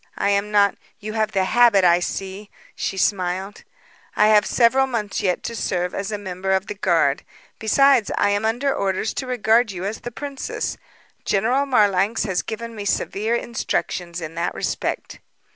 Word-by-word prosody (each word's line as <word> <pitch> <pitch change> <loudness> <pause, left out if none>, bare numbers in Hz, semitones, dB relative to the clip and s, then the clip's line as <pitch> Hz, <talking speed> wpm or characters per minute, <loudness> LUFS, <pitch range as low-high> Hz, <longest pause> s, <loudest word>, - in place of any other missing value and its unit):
I 200 - +1
am 200 +1 0
not 205 -1 +3
" - - -39
"You 215 +1 -6
have 220 -1 0
the 190 -1 +2
habit, 225 -1 +4
I 175 -1 +5
see," 195 +3 -5 0.3
she 195 - -3
smiled. 190 0 -1 0.5
"I 210 +1 +4
have 210 -1 +5
several 260 +3 +3
months 220 -5 -3
yet 180 -2 0
to 230 - -4
serve 180 -4 -2
as 200 +1 -4
a 210 - -2
member 190 -1 -3
of 190 +1 +1
the - - -5
guard. 170 -8 +1 0.4
Besides, 250 +1 +4
I 205 - +3
am 205 +1 0
under 245 +5 0
orders 195 +2 -1
to 260 - -4
regard 235 -1 +2
you 185 0 -5
as 210 +3 -3
the 240 - -6
princess. 280 +3 -5 0.5
General 245 +8 +1
Marlanx 205 -4 +2
has 190 -4 0
given 230 +1 -6
me 210 - -5
severe 210 +3 -1
instructions 180 -7 -3
in 160 0 -6
that 170 +1 -2
respect." - - -3
205 Hz, 175 wpm, -22 LUFS, 190-230 Hz, 0.5 s, I